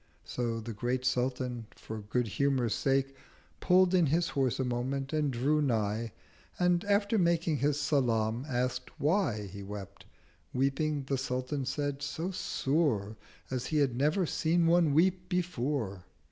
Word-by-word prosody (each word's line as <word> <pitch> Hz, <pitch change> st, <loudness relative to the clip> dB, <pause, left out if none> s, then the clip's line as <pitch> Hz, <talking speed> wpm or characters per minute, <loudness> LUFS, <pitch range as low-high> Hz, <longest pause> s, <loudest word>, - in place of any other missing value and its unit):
So 115 Hz, -2 st, -2 dB
the 115 Hz, +1 st, -6 dB
Great 125 Hz, +4 st, -2 dB
Sultan, 125 Hz, -2 st, -1 dB
for 110 Hz, 0 st, -7 dB
good 115 Hz, +4 st, -1 dB
humour's 130 Hz, +1 st, +1 dB
sake 135 Hz, 0 st, +1 dB, 0.4 s
Pull'd 185 Hz, 0 st, +4 dB
in 175 Hz, -4 st, +4 dB
his 165 Hz, +4 st, +1 dB
Horse 135 Hz, -3 st, 0 dB
a -, -, +2 dB
moment, 130 Hz, +3 st, -2 dB
and 150 Hz, -2 st, +1 dB
drew 140 Hz, +5 st, +1 dB
nigh, 115 Hz, -4 st, 0 dB, 0.5 s
And 180 Hz, -1 st, +2 dB
after 205 Hz, +1 st, +2 dB
making 170 Hz, -3 st, +2 dB
his 145 Hz, +1 st, +1 dB
Salam, 115 Hz, -5 st, +1 dB
ask'd 125 Hz, 0 st, -1 dB
why 170 Hz, +8 st, +3 dB, 0.3 s
160 -, -, -8 dB
He -, -, -7 dB
wept—weeping, 135 Hz, -, -4 dB
the 135 Hz, 0 st, -1 dB
Sultan 130 Hz, +1 st, -2 dB
said, 145 Hz, 0 st, -2 dB
so 160 Hz, +5 st, -3 dB
sore 135 Hz, -, 0 dB, 0.4 s
As 130 Hz, -1 st, -2 dB
he 155 Hz, -, 0 dB
had 140 Hz, -5 st, +2 dB
never 155 Hz, +8 st, +2 dB
seen 165 Hz, +2 st, +1 dB
one 165 Hz, -3 st, +4 dB
weep 180 Hz, +3 st, +2 dB
before. 140 Hz, -, -2 dB
135 Hz, 145 wpm, -31 LUFS, 120-160 Hz, 0.5 s, Pull'd